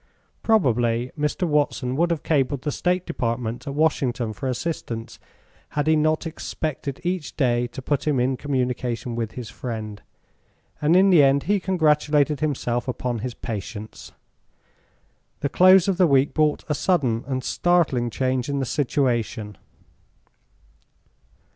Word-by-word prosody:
Probably 120 - +2
Mr. 150 +4 -1
Watson 145 -4 0
would 170 +4 +2
have 170 -3 -2
cabled 140 -3 0
the 150 - -1
State 180 +4 0
Department 120 -4 -3
at 140 - -4
Washington 130 -7 0
for 130 +5 -4
assistance 120 -4 -4 0.6
had 145 - +2
he 160 0 +4
not 155 +1 +1
expected 155 -3 -4
each 175 -3 -3
day 120 -3 +2
to 130 +2 -9
put 145 +2 -1
him 145 -4 +2
in 130 +2 +1
communication 125 -3 -2
with 115 -2 -3
his 120 -4 -7
friend, 110 -3 -6 0.8
and 155 +3 +3
in 190 +1 +6
the 170 -5 +7
end 140 0 +4
he 205 0 +1
congratulated 150 -5 +2
himself 125 -5 -1
upon 125 -1 -2
his 125 +2 -5
patience. 110 0 -7 1.3
The 140 - 0
close 185 +4 +6
of 195 -3 +1
the 185 -2 +5
week 140 -1 +3
brought 155 -1 +1
a 150 - 0
sudden 140 -8 +1
and 130 -2 -2
startling 155 -10 +1
change 130 +2 -1
in 140 - -1
the 135 - -1
situation. 120 -5 -1
135 Hz, 140 wpm, -23 LUFS, 120-155 Hz, 1.3 s, the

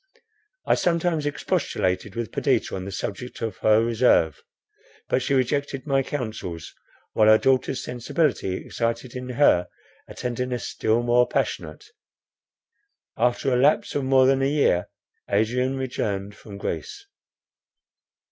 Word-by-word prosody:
I - - +3
sometimes 170 -3 +1
expostulated 95 -8 -1
with 115 -2 -4
Perdita - - 0
on 95 -1 -5
the 100 - -6
subject 105 +5 -5
of 115 - -3
her 110 +1 +3
reserve; 115 - +2 0.7
but 130 - +1
she 140 - 0
rejected 135 +1 -1
my 135 -2 +2
counsels, 110 - -5 0.4
while 110 - +4
her 110 0 +8
daughter's 130 0 +1
sensibility 125 - -1
excited 115 +4 -3
in 125 0 -6
her 120 -9 +3 0.4
a - - -11
tenderness 125 0 -3
still 115 +2 0
more 120 +1 +3
passionate. 75 0 -3 1.3
After 125 +3 +1
the 125 - +3
lapse 140 +5 +3
of 145 - -1
more 130 0 +4
than 135 0 +3
a 135 - +2
year, 140 -12 +2 0.4
Adrian 125 +6 +1
returned 105 -6 -3
from 100 -2 -11
Greece. 405 - -5
125 Hz, 130 wpm, -24 LUFS, 110-135 Hz, 1.3 s, her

